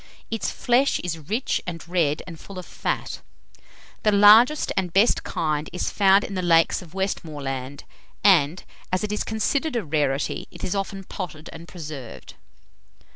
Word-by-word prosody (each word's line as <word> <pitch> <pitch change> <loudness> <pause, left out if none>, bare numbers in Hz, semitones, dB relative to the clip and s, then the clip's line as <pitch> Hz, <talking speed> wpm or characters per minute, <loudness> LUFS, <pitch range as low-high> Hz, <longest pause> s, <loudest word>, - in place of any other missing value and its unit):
Its 225 - -1
flesh 250 +3 +2
is 165 -2 -4
rich 230 +6 0
and 170 -1 -6
red, 165 -4 0
and 165 -3 -10
full 195 - -11
of 180 - -6
fat. - - -4 0.8
The 215 - +3
largest 215 +8 +6
and 185 -3 -1
best 200 +7 +3
kind 155 -1 -2
is 180 - -2
found 195 0 +4
in - - -6
the 185 - -2
lakes 165 -2 +3
of 175 0 -14
Westmoreland, 145 -8 -4 0.4
and, 175 -4 +4 0.3
as 185 +3 0
it 210 - -2
is 210 - -1
considered 270 +7 -1
a 230 - -1
rarity, 145 -2 -1
it - - -12
is 180 - -1
often 195 -1 -3
potted 165 -5 -7
and 165 +1 -10
preserved. 150 -9 -9
180 Hz, 160 wpm, -24 LUFS, 155-205 Hz, 0.8 s, largest